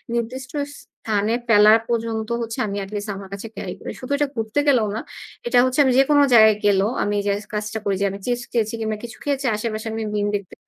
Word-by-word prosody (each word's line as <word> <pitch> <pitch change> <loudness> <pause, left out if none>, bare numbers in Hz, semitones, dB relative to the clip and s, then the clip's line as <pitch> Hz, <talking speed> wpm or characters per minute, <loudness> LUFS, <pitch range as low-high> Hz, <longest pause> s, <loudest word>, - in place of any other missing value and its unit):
নির্দিষ্ট 250 +2 -4 0.3
স্থানে 215 0 -2
ফেলার 215 0 +7
পর্যন্ত 225 -2 -1
হচ্ছে 225 -1 -4
আমি 200 0 -4
at - - -13
least 205 +1 -4
আমার 195 -1 -9
কাছে 200 +3 -6
carry - - -5
করি। - - -6
শুধু 255 - -7
এটা 290 -1 +1
ঘুরতে 225 +5 -1
গেলেও 240 -6 +4
না, - - -3 0.5
এটা 245 +1 +2
হচ্ছে 255 +3 -1
আমি 265 - +3
যেকোনো 285 +2 +5
জায়গায় 220 -2 +7
গেলেও 200 0 +3
আমি 205 - 0
এই - - -2
যে - - +3 0.2
কাজটা 210 +1 -3
করি 200 -1 +1
যে - - +3
আমি 195 - -7
chips 245 -1 -1
খেয়েছি 225 -2 0
কিংবা 220 -1 -2
কিছু 230 -2 -8
খেয়েছি। 280 -1 -1
আশেপাশে 215 0 -4
আমি 225 0 -3
bin 205 -1 0
দেখতে 200 -3 -5
220 Hz, 220 wpm, -22 LUFS, 210-240 Hz, 0.5 s, ফেলার